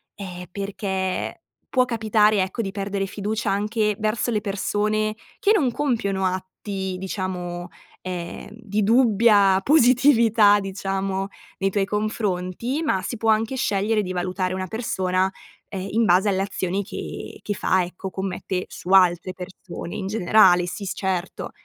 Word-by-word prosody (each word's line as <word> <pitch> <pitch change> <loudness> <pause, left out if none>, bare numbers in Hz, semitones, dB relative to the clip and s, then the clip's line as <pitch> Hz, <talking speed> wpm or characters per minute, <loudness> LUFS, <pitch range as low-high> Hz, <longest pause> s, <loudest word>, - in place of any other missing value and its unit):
ehm, 180 -3 -7
perché 190 -1 -3 0.3
può 255 - +3
capitare, 215 -3 +3
ecco, 190 +5 -2
di 195 - -3
perdere 195 0 -2
fiducia 210 +1 -2
anche 210 +1 0
verso 215 +2 0
le 215 - +1
persone 210 +1 -1 0.2
che 410 - +3
non 295 - +3
compiono 225 -9 0
atti 190 +1 -3
diciamo, 180 -2 -4 0.3
ehm, 175 -2 -6
di 215 -2 -2
dubbia 210 -4 +5
positività 235 -6 +5
diciamo 195 0 -2 0.3
nei 195 - +1
tuoi 195 0 0
confronti, 210 - -2
ma 190 -11 +1
si 225 +5 -4
può 225 0 0
anche 225 +4 +2
scegliere 210 -1 +1
di 185 -2 -4
valutare 185 +1 -2
una 185 0 -3
persona, 190 -4 0 0.4
ehm, 190 -1 -5
in 225 +1 +2
base 190 +3 +4
alle 190 -1 +1
azioni 195 0 -2
che - - -7
che 205 - -2
fa 185 -1 +2
ecco 180 +2 -6
commette 190 -1 -3
su 180 - -9
altre 185 -1 +4
persone, 180 -1 -8
in 190 - -4
generale. 190 -3 +5
Sì, 200 +3 -5
s - - -2
certo. 190 -2 -3
195 Hz, 145 wpm, -23 LUFS, 185-215 Hz, 0.4 s, dubbia